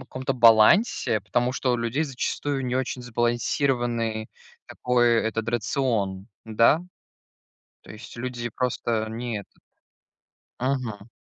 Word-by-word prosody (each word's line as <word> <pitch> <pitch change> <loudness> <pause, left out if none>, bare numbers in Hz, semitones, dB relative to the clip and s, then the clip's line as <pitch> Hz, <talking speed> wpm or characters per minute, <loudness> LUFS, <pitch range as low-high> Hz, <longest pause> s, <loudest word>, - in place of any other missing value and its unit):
каком-то 130 +1 -3
балансе, 115 - +5
потому 120 +5 0
что 130 -1 0
у - - +1
людей 115 +6 -1
зачастую 135 0 -3
не 125 - -2
очень 130 -1 -2
сбалансированный 120 -1 -1 0.4
такой, 120 -1 +2
этот 110 0 -2
рацион, 110 -5 -1 0.2
да? 115 +8 +3 1.0
То - - -15
есть 110 +2 -11
люди 120 -1 -4
просто 115 -2 -1
не 115 -1 -4
этот - - -19 1.0
Мгм. 125 -5 -3
120 Hz, 110 wpm, -25 LUFS, 110-130 Hz, 1.0 s, балансе